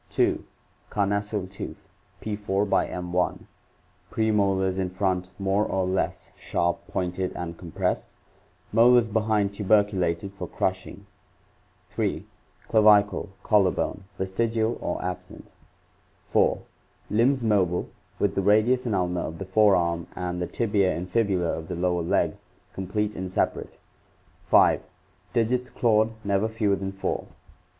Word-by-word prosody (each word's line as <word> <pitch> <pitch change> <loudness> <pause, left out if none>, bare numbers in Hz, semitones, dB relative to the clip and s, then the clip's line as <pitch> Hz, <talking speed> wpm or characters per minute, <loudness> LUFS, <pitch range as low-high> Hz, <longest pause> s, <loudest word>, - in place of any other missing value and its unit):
2. - - +1 0.5
Carnassial 100 -1 -1
tooth 95 +1 -8 0.2
= - - -37
~, - - -19
premolars 95 -4 0 1.4
in 95 -1 -1
front 90 -1 -1
more 100 +1 +1
or 95 -3 0
less 95 +1 -2
sharp 85 0 0
pointed 90 0 -2
and 85 -1 -5
compressed; 85 -3 -2 0.7
molars 120 +1 +6
behind 105 -2 +1
tuberculated 100 -3 +1
for 100 - -6
crushing. 95 +1 -3 0.9
3. - - -2 0.4
Clavicle 105 -2 +4
(collar 100 -3 +4
bone) 95 +1 -3
vestigial 110 +4 0
or - - -2
absent. 90 0 -7 0.7
4. - - +2 0.5
Limbs 120 +4 +3
mobile, 95 -5 +1 0.3
with - - +1
the - - 0
radius 110 +6 +3
and 110 - 0
ulna 90 -1 0
of 80 - -5
the 95 - -6
fore 105 +1 +4
arm 85 -1 0
and 90 -1 -3
the 90 - -1
tibia 100 -5 +1
and 90 +1 -6
fibula 100 -6 +1
of 80 0 -7
the - - -4
lower 90 0 0
leg 85 - +1 0.4
complete 105 +3 -2
and 95 0 -5
separate, - - -1 0.7
5. - - +5 0.5
Digits 125 +1 +1
clawed, 110 -1 +2
never 100 +1 +1
fewer 110 -3 +1
than 95 0 -4
four. 95 0 -3
100 Hz, 125 wpm, -26 LUFS, 90-110 Hz, 1.4 s, molars